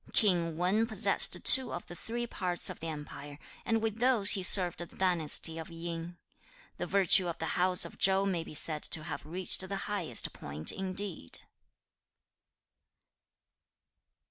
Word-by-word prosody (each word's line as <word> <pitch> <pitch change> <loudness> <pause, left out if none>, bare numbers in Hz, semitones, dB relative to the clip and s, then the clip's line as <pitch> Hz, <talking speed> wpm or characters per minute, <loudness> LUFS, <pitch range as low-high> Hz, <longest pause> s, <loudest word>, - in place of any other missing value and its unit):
'King 170 -6 0
Wan 195 +6 -1
possessed 220 -2 +4
two 260 -1 +7
of 175 - -8
the - - -12
three 235 +6 -6
parts 180 -6 0
of - - -12
the 165 - -7
empire, 145 -2 -10 0.3
and 225 -1 -2
with 220 0 -4
those 240 -5 +2
he 195 - +3
served 180 -1 +4
the 175 - -6
dynasty 165 -3 +2
of 160 - -10
Yin. 170 +1 -8 0.6
The - - -6
virtue 190 -2 +3
of 170 - -6
the 160 - -5
house 180 0 +3
of - - -12
Chau 195 +1 +2
may 180 -4 -3
be 155 - -13
said 155 0 -5
to 160 - 0
have - - -8
reached 180 +4 -2
the 200 - -4
highest 200 -6 -2
point 75 +2 -6
indeed.' 190 - -3
180 Hz, 155 wpm, -29 LUFS, 165-200 Hz, 0.6 s, two